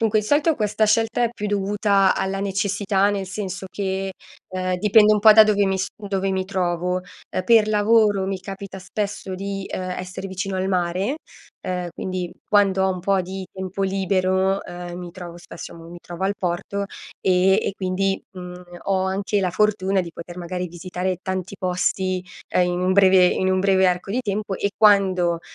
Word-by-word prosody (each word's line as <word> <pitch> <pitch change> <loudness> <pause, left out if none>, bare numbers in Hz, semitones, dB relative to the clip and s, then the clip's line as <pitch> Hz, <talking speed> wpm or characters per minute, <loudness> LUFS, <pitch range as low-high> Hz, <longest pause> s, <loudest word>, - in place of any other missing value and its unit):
Dunque 220 -1 +3
il - - -8
solito 295 +7 +3
questa 215 -3 +1
scelta 225 +2 +2
è 235 - 0
più 210 -3 -4
dovuta 200 -1 +2
alla 195 0 -2
necessità, 200 0 +1
nel 200 -2 -2
senso 190 0 -5
che, 195 -1 -3 0.4
ehm, 185 0 -2
dipende 210 +1 +5
un 210 - +3
po' 215 0 +9
da 220 +1 +9
dove 205 -1 +2
mi 190 0 +1
s 190 - 0
dove 195 -2 -2
mi 190 0 -1
trovo. 180 -1 -1 0.3
Eh, 185 - -2
per 225 +1 +5
lavoro 210 -2 +3
mi 195 0 -2
capita 195 0 -8
spesso 200 0 -4
di, 195 +1 -4
ehm, 185 0 -4
essere 185 +1 -6
vicino 190 +1 -4
al 185 +1 -1
mare, 185 - 0 0.5
ehm, 180 -1 -2
quindi 185 -1 -4 0.2
quando 195 -2 +3
ho 190 - +2
un 180 - -6
po' 195 +1 +2
di 190 +1 -6
tempo 190 0 -4
libero, 190 0 +1
ehm, 175 0 -7
mi 175 -1 -7
trovo 175 -1 -9
spesso 175 - -10
mo, 165 0 -12
mi 175 +1 -10
trovo 175 +1 -8
al 195 +1 +1
porto, 180 +3 -2 0.4
ehm, 185 +1 +4
e - - -2
quindi, 195 0 -1
mhmm, 180 0 -9 0.2
ho 190 -1 +1
anche 195 +2 0
la 185 -2 0
fortuna 195 -1 +1
di 170 -2 -6
poter 175 +1 -9
magari 180 +1 -4
visitare 180 +1 -4
tanti 190 +1 -4
posti, 185 0 -1 0.2
ehm, 180 - +2 0.2
in 185 +1 +2
breve 190 -1 +6
in 185 +1 +1
un 185 - +2
breve 190 -1 +4
arco 180 +2 -2
di 250 - 0
tempo 205 -2 -3
e 200 - -1
quando 185 -5 +4
190 Hz, 185 wpm, -22 LUFS, 185-200 Hz, 0.5 s, po